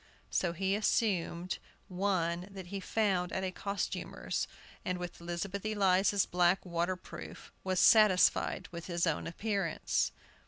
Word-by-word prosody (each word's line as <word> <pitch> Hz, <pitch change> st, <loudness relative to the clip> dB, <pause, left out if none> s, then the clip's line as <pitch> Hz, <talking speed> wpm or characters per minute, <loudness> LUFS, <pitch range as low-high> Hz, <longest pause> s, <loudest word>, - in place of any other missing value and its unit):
So 175 Hz, -2 st, +1 dB
he 190 Hz, +3 st, 0 dB
assumed 185 Hz, -5 st, 0 dB, 0.3 s
one 180 Hz, -2 st, 0 dB
that 195 Hz, -2 st, -8 dB
he 200 Hz, -, -2 dB
found 190 Hz, -3 st, 0 dB
at 190 Hz, -, -2 dB
a 185 Hz, -, -1 dB
costumer's, 200 Hz, +2 st, -3 dB, 0.4 s
and 180 Hz, 0 st, -1 dB
with 180 Hz, -1 st, -7 dB
Elizabeth 175 Hz, +3 st, -4 dB
Eliza's 200 Hz, -2 st, +3 dB
black 180 Hz, +2 st, +2 dB
waterproof 175 Hz, +1 st, -4 dB
was 185 Hz, -1 st, 0 dB
satisfied 190 Hz, -3 st, +5 dB
with 170 Hz, -1 st, -7 dB
his 170 Hz, -1 st, 0 dB
own 165 Hz, -3 st, 0 dB
appearance. 195 Hz, -1 st, 0 dB
185 Hz, 125 wpm, -32 LUFS, 175-200 Hz, 0.4 s, satisfied